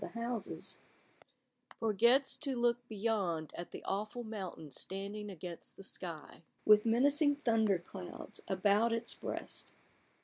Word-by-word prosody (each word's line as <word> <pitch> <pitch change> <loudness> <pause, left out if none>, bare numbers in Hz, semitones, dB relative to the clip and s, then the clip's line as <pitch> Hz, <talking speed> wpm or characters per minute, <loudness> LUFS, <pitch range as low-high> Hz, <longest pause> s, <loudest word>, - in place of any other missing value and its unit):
the - - -6
houses, 230 -3 -4 1.0
forgets 235 +5 +4
to 275 -3 -2
look 240 0 +3
beyond 200 -8 0
at 175 - -5
the - - -8
aweful 215 +5 -2
mountain 190 -8 -6
standing 200 +7 -5
against 175 -2 -8
the 195 - -10
sky, 170 -5 -7 0.2
with 210 +1 +7
menacing 285 +5 +4
thunder 225 -7 +3
clouds 175 +1 -7
about 205 +4 +3
its 230 +1 +1
breast. - - -5
210 Hz, 125 wpm, -35 LUFS, 190-235 Hz, 1.0 s, with